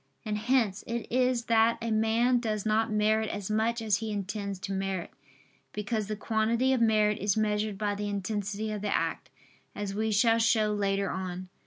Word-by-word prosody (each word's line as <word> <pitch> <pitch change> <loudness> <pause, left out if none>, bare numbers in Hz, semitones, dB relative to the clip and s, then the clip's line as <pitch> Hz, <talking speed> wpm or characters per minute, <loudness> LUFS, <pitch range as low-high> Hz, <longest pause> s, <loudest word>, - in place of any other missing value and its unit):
And 215 -1 -1
hence 220 -4 +1
it 235 0 -3
is 250 -1 +2
that 230 0 +3
a 230 -1 -3
man 225 +3 +3
does 215 -3 -2
not 220 +1 +1
merit 215 +1 +2
as 205 0 -4
much 225 +2 0
as 210 -3 +2
he 220 +1 -4
intends 200 0 -3
to 195 - -4
merit: 190 -2 -3 0.6
because 210 0 -2
the 215 - -3
quantity 230 +4 +1
of 255 - +1
merit 215 -2 +3
is 200 +1 0
measured 210 -1 0
by 205 0 -1
the 205 0 -3
intensity 205 +1 -3
of 210 -1 -4
the 210 - -2
act, 165 -5 -1 0.5
as 205 -1 -4
we 220 +2 -1
shall 225 +2 +4
show 220 -2 +3
later 200 -1 0
on 185 -1 -4
(Q. 185 - -11
215 Hz, 190 wpm, -29 LUFS, 205-225 Hz, 0.6 s, shall